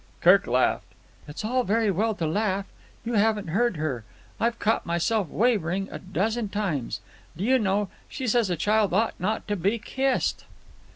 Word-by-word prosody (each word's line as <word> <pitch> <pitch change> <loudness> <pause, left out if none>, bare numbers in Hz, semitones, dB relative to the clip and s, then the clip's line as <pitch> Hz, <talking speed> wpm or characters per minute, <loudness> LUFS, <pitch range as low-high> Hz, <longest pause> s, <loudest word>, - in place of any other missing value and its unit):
Kirk - - +5
laughed. - - +1 0.3
"It's 150 +8 -6
all 250 +3 +1
very 220 -1 +2
well 215 +4 0
to 170 - -2
laugh. 195 +3 0 0.4
You 235 - -2
haven't 210 -3 +2
heard 220 +2 +1
her. 140 -7 -2 0.4
I've 230 +1 +1
caught 220 0 +1
myself 175 +3 0
wavering 195 - +1
a - - -6
dozen 210 +4 -1
times. 185 - -2 0.4
Do 180 - -3
you 260 +4 +4
know, 205 -1 +1 0.2
she 265 - -5
says 235 -3 +2
a 175 - +1
child 205 +2 +2
ought 225 +2 +2
not 215 +5 -2
to 205 - 0
be 200 +5 +1
kissed?" 265 +5 -1
210 Hz, 170 wpm, -26 LUFS, 185-225 Hz, 0.4 s, Kirk